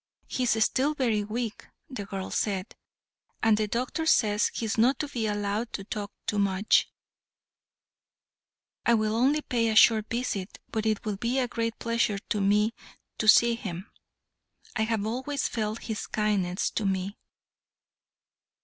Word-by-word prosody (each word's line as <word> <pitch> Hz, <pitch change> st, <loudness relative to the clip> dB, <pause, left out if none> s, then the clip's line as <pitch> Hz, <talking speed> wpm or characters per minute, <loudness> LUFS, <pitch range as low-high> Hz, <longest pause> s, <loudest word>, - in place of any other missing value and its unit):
"He -, -, -4 dB
is 220 Hz, -2 st, +3 dB
still 290 Hz, +4 st, +1 dB
very 230 Hz, -7 st, +1 dB
weak," 220 Hz, +1 st, -4 dB, 0.2 s
the 210 Hz, -7 st, -6 dB
girl 190 Hz, -1 st, -5 dB
said, 195 Hz, -1 st, -2 dB, 0.7 s
"and 220 Hz, -1 st, +5 dB
the 215 Hz, 0 st, 0 dB
doctor 255 Hz, +9 st, -2 dB
says 210 Hz, -7 st, +3 dB
he 230 Hz, -, -3 dB
is 220 Hz, -, -1 dB
not 245 Hz, +4 st, +3 dB
to 300 Hz, -, -2 dB
be 235 Hz, -6 st, -2 dB
allowed 205 Hz, +2 st, -2 dB
to 195 Hz, -, -4 dB
talk 205 Hz, 0 st, -5 dB, 0.2 s
much." 200 Hz, 0 st, +2 dB, 1.9 s
"I 235 Hz, -, +4 dB
will 215 Hz, 0 st, 0 dB
only 280 Hz, +6 st, +2 dB
pay 230 Hz, -2 st, 0 dB
a 220 Hz, -, 0 dB
short 220 Hz, 0 st, +6 dB
visit, 230 Hz, -5 st, -3 dB
but 220 Hz, -1 st, -1 dB
it 215 Hz, 0 st, 0 dB
will 210 Hz, -2 st, -2 dB
be 235 Hz, +5 st, -1 dB
a 255 Hz, -2 st, +1 dB
great 230 Hz, -1 st, -2 dB
pleasure 230 Hz, -3 st, 0 dB
to 210 Hz, 0 st, -3 dB
me 210 Hz, +3 st, +3 dB, 0.5 s
to 220 Hz, -, -1 dB
see 235 Hz, +2 st, +7 dB
him; 195 Hz, -3 st, -6 dB, 0.8 s
I 220 Hz, -, +1 dB
have 220 Hz, -2 st, -1 dB
always 260 Hz, +5 st, -2 dB
felt 215 Hz, -1 st, -3 dB
his 220 Hz, -2 st, -4 dB
kindness 200 Hz, -4 st, 0 dB
to 215 Hz, -, -2 dB
me." 190 Hz, +1 st, -2 dB
220 Hz, 155 wpm, -27 LUFS, 205-235 Hz, 1.9 s, see